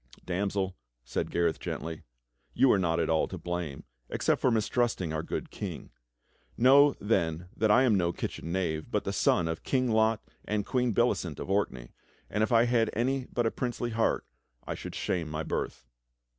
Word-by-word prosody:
"Damsel," 95 Hz, +1 st, -1 dB, 0.3 s
said -, -, -2 dB
Gareth 85 Hz, -1 st, +1 dB
gently, 80 Hz, -1 st, -5 dB, 0.5 s
"you 135 Hz, -, +5 dB
are 100 Hz, -, +4 dB
not 85 Hz, -2 st, +1 dB
all 80 Hz, -1 st, +2 dB
to -, -, -6 dB
blame, 85 Hz, -5 st, -4 dB, 0.3 s
except -, -, +1 dB
for -, -, +4 dB
mistrusting 110 Hz, -6 st, 0 dB
our 80 Hz, -, -1 dB
good -, -, -5 dB
King. -, -, -6 dB, 0.7 s
Know 140 Hz, +4 st, +6 dB
then 90 Hz, -5 st, 0 dB
that 110 Hz, 0 st, +1 dB
I 120 Hz, +5 st, +6 dB
am 125 Hz, -4 st, +4 dB
no 90 Hz, -3 st, +2 dB
kitchen 85 Hz, -1 st, -5 dB
knave 85 Hz, -4 st, -1 dB
but -, -, 0 dB
the -, -, -2 dB
son 85 Hz, -, +2 dB
of 80 Hz, 0 st, -3 dB
King 130 Hz, -3 st, +1 dB
Lot 110 Hz, 0 st, +3 dB, 0.2 s
and 105 Hz, -1 st, -1 dB
Queen 125 Hz, -2 st, +1 dB
Bellicent 100 Hz, -, +1 dB
of -, -, -4 dB
Orkney, 65 Hz, -12 st, -1 dB, 0.4 s
and 105 Hz, -, 0 dB
if 110 Hz, -, +1 dB
I 115 Hz, 0 st, +5 dB
had 115 Hz, -2 st, +2 dB
any 130 Hz, +3 st, 0 dB
but 120 Hz, -, 0 dB
a 115 Hz, -, +2 dB
princely 120 Hz, -1 st, -3 dB
heart 110 Hz, 0 st, +1 dB, 0.4 s
I -, -, -3 dB
should -, -, -7 dB
shame 85 Hz, -4 st, -1 dB
my 75 Hz, +1 st, -3 dB
birth." 65 Hz, -, -3 dB
100 Hz, 180 wpm, -29 LUFS, 85-120 Hz, 0.7 s, Know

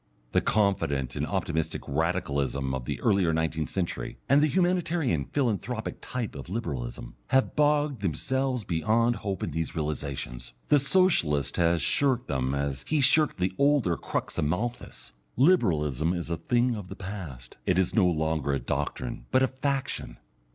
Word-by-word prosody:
The -, -, +3 dB
confident 80 Hz, -, +1 dB
and -, -, -1 dB
optimistic 80 Hz, 0 st, -2 dB
Radicalism 70 Hz, -4 st, -1 dB
of 65 Hz, -2 st, -3 dB
the -, -, -3 dB
earlier 95 Hz, -6 st, +3 dB
nineteenth 80 Hz, -1 st, -1 dB
century, 90 Hz, -3 st, -3 dB
and 140 Hz, +2 st, +5 dB
the 155 Hz, -, +4 dB
humanitarian 170 Hz, -, +1 dB
philanthropic 120 Hz, -, -2 dB
type 125 Hz, -4 st, -4 dB
of -, -, -8 dB
Liberalism, 65 Hz, -, -4 dB
have 130 Hz, 0 st, +2 dB
bogged 145 Hz, -4 st, +2 dB
themselves 130 Hz, -, -1 dB
beyond 110 Hz, +8 st, +1 dB
hope 95 Hz, -3 st, -3 dB
in -, -, -2 dB
these 80 Hz, +2 st, -3 dB
realizations. 70 Hz, -6 st, -4 dB, 0.2 s
The 145 Hz, -, +6 dB
Socialist 135 Hz, -, +2 dB
has 85 Hz, -1 st, +2 dB
shirked 130 Hz, -4 st, +1 dB
them 65 Hz, -1 st, -1 dB
as 70 Hz, -1 st, -2 dB
he 155 Hz, -, 0 dB
has 140 Hz, -3 st, +5 dB
shirked 155 Hz, +2 st, +3 dB
the 90 Hz, +1 st, 0 dB
older 140 Hz, -, +3 dB
crux -, -, -3 dB
of -, -, +1 dB
Malthus. 115 Hz, +10 st, -3 dB, 0.3 s
Liberalism 85 Hz, -, +3 dB
is 85 Hz, -1 st, -4 dB
a 85 Hz, -, 0 dB
thing 120 Hz, +8 st, +1 dB
of 105 Hz, -4 st, -7 dB
the -, -, -8 dB
past, 90 Hz, -12 st, -8 dB
it 90 Hz, -, +3 dB
is 95 Hz, -2 st, +2 dB
no 100 Hz, -5 st, +4 dB
longer 80 Hz, -4 st, 0 dB
a 70 Hz, -, 0 dB
doctrine, -, -, -3 dB
but 130 Hz, -, +3 dB
a -, -, +4 dB
faction. 135 Hz, 0 st, -3 dB
90 Hz, 160 wpm, -27 LUFS, -, 0.3 s, The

